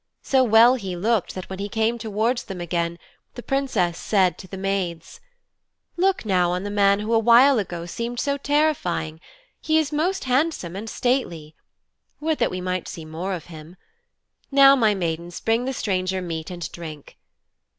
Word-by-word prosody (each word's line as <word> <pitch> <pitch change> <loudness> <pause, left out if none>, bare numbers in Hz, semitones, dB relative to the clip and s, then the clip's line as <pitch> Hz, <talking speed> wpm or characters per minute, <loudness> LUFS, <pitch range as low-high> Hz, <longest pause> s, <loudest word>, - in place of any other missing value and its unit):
So 265 -1 +3
well 230 +1 +6
he 195 -8 -4
looked 210 +2 0
that 185 - -6
when 190 0 -7
he 200 +1 -4
came 225 +2 0
towards 225 +3 -1
them 190 -3 -7
again 170 0 -2 0.4
the 245 - -8
Princess 260 -11 0
said 185 -5 +2
to 185 - -10
the 195 - -8
maids: 190 -4 -3 0.8
'Look 375 -5 +1
now 180 -4 +2
on 180 +1 -2
the 205 - -4
man 200 0 +3
who 220 +2 -2
a 225 - +5
while 240 +3 +6
ago 175 -4 -4
seemed 235 +7 -4
so 280 -1 0
terrifying! 280 - 0 0.4
He 315 0 +2
is 310 -2 +1
most 350 +6 -1
handsome 255 - 0
and 215 +3 -6
stately. 175 - -1 0.7
Would 315 0 -1
that - - +2
we 185 - -5
might 185 -1 -3
see 165 - -8
more 170 +5 -4
of 165 - -9
him. 155 +3 -11 0.7
Now, 275 0 +7
my 220 -5 +3
maidens, 170 -1 -4
bring 225 +2 0
the 265 - -1
stranger 185 -4 -1
meat 165 -3 -5
and 175 -2 -6
drink.' 155 -4 -10
200 Hz, 175 wpm, -23 LUFS, 175-250 Hz, 0.8 s, Now